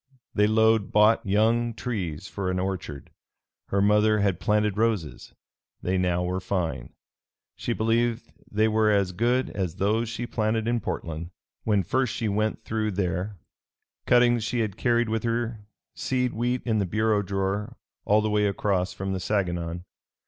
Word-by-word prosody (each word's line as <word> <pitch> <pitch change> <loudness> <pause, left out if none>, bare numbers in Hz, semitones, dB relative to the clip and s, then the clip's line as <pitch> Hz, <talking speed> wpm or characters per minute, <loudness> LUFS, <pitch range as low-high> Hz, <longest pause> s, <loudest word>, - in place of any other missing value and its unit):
They 105 0 +3
load 110 -1 +3
bought 105 +2 +5
young 115 +3 +2
trees 95 - -4
for 95 -2 -3
an 90 - -1
orchard. 90 -7 -4 0.6
Her 100 0 +1
mother 105 +1 +4
had 100 -4 +1
planted 105 -1 +1
roses; 105 -8 -1 0.5
they 90 - 0
now 90 -1 +1
were 90 +1 -1
fine. 85 -10 -3 0.6
She - - -3
believed 115 +1 0 0.2
they 110 +1 +3
were 110 0 +3
as 100 -3 +2
good 120 +7 +1
as 90 -5 -3
those 110 +3 0
she 115 +1 -4
planted 110 -1 -1
in 120 0 +1
Portland, 85 -5 -4 0.4
when 105 -3 +2
first 130 +5 0
she 115 - -1
went 105 +1 -1
through 110 -1 -2
there 95 +1 -2 0.7
cuttings 120 -1 +4
she 120 +2 -1
had 105 -4 -2
carried 120 0 +2
with 110 0 -1
her 115 -2 -2 0.3
seed 125 -1 -1
wheat 120 +2 -1
in 110 -3 +1
the 100 - 0
bureau 110 +2 +1
drawer, 100 +4 -2 0.3
all 105 +1 +3
the 110 0 -1
way 105 0 +2
across 100 -2 0
from 95 0 -3
the 95 - -2
Saganon. 90 -3 -2
105 Hz, 160 wpm, -26 LUFS, 95-115 Hz, 0.7 s, bought